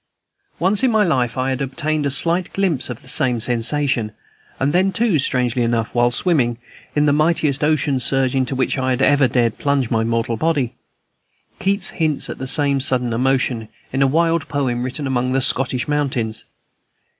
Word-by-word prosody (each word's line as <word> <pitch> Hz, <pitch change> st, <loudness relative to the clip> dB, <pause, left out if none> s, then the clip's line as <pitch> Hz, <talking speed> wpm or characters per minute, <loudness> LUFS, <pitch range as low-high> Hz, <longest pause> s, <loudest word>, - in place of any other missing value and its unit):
Once 190 Hz, +5 st, +2 dB
in 260 Hz, -, +3 dB
my 220 Hz, -2 st, +3 dB
life 130 Hz, -, 0 dB
I 130 Hz, +1 st, 0 dB
had 130 Hz, +1 st, -3 dB
obtained 145 Hz, +2 st, -2 dB
a -, -, 0 dB
slight 170 Hz, +6 st, 0 dB
glimpse 180 Hz, -11 st, 0 dB
of 125 Hz, -, -7 dB
the -, -, -17 dB
same 125 Hz, -2 st, 0 dB
sensation, 120 Hz, 0 st, 0 dB, 0.5 s
and 140 Hz, +3 st, 0 dB
then, 190 Hz, +2 st, +2 dB
too, 215 Hz, -7 st, +1 dB
strangely 125 Hz, -2 st, 0 dB
enough, 115 Hz, -2 st, -1 dB
while 120 Hz, 0 st, +3 dB
swimming, 120 Hz, -4 st, +2 dB, 0.4 s
in 150 Hz, 0 st, +3 dB
the 145 Hz, -, +3 dB
mightiest 150 Hz, -2 st, +1 dB
ocean 150 Hz, -3 st, +1 dB
surge 130 Hz, 0 st, +1 dB
into 130 Hz, 0 st, -1 dB
which 130 Hz, +1 st, -1 dB
I 130 Hz, 0 st, -1 dB
had 130 Hz, +1 st, 0 dB
ever 145 Hz, -2 st, +4 dB
dared 120 Hz, -2 st, 0 dB
plunge 140 Hz, -4 st, 0 dB
my 110 Hz, -1 st, +1 dB
mortal 115 Hz, 0 st, -1 dB
body. 145 Hz, -3 st, 0 dB, 0.9 s
Keats 195 Hz, 0 st, 0 dB
hints 155 Hz, -4 st, -2 dB
at -, -, -9 dB
the 130 Hz, -, -4 dB
same 140 Hz, 0 st, +2 dB
sudden 125 Hz, -3 st, +1 dB
emotion, 125 Hz, -2 st, 0 dB, 0.2 s
in 135 Hz, -, 0 dB
a 135 Hz, -, +5 dB
wild 165 Hz, +2 st, +1 dB
poem 130 Hz, -4 st, -1 dB
written 130 Hz, +4 st, -4 dB
among 130 Hz, -1 st, -1 dB
the 135 Hz, -, +2 dB
Scottish 130 Hz, -1 st, 0 dB
mountains. 130 Hz, -7 st, -1 dB
135 Hz, 180 wpm, -19 LUFS, 125-150 Hz, 0.9 s, a